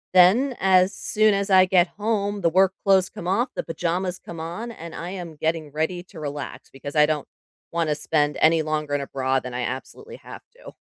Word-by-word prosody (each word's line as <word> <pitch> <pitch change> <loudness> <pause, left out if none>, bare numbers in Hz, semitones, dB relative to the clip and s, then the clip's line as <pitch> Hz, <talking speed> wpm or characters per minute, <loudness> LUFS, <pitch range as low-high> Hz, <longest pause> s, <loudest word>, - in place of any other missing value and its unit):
then 230 +10 +5
as 190 0 +4
soon 215 0 +2
as 200 0 -1
I 185 -1 +7
get 180 -1 +4
home, 205 -1 -1
the 175 - +1
work 190 +3 +4
clothes 190 -1 +4
come 170 - -8
off, 230 +8 +1
the - - -3
pajamas 180 +2 -2
come 170 -2 -10
on, 175 +9 -5
and 170 -6 -9
I 175 +2 -5
am 175 -4 -7
getting 160 0 -2
ready 170 +3 -2
to 180 -2 -13
relax 145 -3 -6
because 140 +2 -9
I 150 -1 +6
don't 150 -2 -2 0.5
wanna 165 -3 0
spend 150 -1 0
any 160 +1 +4
longer 155 -2 -2
in 145 - -1
a 140 - -6
bra 130 0 0
than 125 -1 -7
I 125 - -2
absolutely 440 - -6
have - - -11
to. - - -12
170 Hz, 210 wpm, -24 LUFS, 150-195 Hz, 0.5 s, I